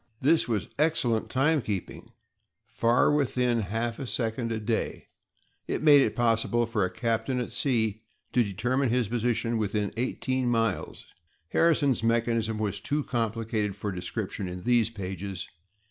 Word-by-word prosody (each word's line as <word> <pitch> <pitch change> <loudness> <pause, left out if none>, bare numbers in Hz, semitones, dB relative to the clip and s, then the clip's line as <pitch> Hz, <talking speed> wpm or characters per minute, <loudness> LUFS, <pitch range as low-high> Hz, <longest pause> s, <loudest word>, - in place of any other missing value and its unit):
This 145 -4 +3
was 110 -5 -1
excellent 130 -8 +1
timekeeping—far 120 - -1
within 125 -4 +1
half 115 +3 -2
a 135 - -4
second 115 0 -2
a 110 - -1
day; 110 +1 -2 0.6
it - - -2
made 145 -2 +8
it 110 - +1
possible 120 0 +2
for 110 -3 0
a 90 - +1
captain 115 +3 -1
at 125 - -4
sea 110 -6 0 0.3
to 125 - +4
determine 125 +6 0
his 120 -1 +1
position 115 -1 0
within 105 -1 -1
eighteen 130 +1 -1
miles. 115 -4 -1 0.4
Harrison's 145 -7 +3
mechanism 115 -1 +1
was 105 -2 -2
too 145 +1 -1
complicated 115 -4 -1
for 105 0 -4
description 95 +2 -4
in 90 0 -7
these 120 -1 +3
pages. 95 -3 -6
115 Hz, 135 wpm, -27 LUFS, 105-125 Hz, 0.6 s, made